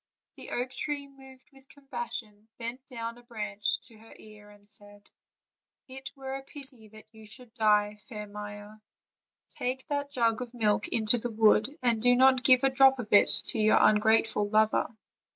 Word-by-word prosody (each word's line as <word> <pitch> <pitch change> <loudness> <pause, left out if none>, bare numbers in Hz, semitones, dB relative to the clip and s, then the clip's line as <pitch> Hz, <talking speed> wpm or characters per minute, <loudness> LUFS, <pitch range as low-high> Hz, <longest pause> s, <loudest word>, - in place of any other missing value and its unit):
The - - -9
oak 250 +1 -3
tree, 285 +1 -3
moved 265 -1 -17
with 270 0 -20
compassion, 240 -6 -7
bent 240 +2 -6
down 230 -1 -6
a - - -16
branch 210 -3 -2
to 220 -2 -19
her 225 +1 -16
ear 210 -1 -15
and 205 0 -20
said: 205 0 -7 0.8
"It 265 0 -8
were 265 -1 -7
a 270 - -5
pity 270 -5 -5
that 215 +1 -15
you 220 -1 -15
should 230 +1 -7
die, 210 -3 +2
fair 210 -3 -6
Maia; 205 +1 -9 0.7
take 255 +1 -4
that 285 -1 -2
jug 230 -4 +1
of 245 0 -7
milk 210 -3 +1
into 225 +1 +1
the 240 - -4
wood, 215 -1 +4 0.2
and 235 -3 +2
do 245 +1 +5
not 260 0 +5
give 255 +1 +6
a 270 - +4
drop 265 0 +5
of 230 -4 -6
it 205 - +6 0.2
to 225 - -1
your 215 0 +4
ungrateful 215 -1 +3
lover." 215 0 +2
230 Hz, 175 wpm, -28 LUFS, 210-260 Hz, 0.8 s, give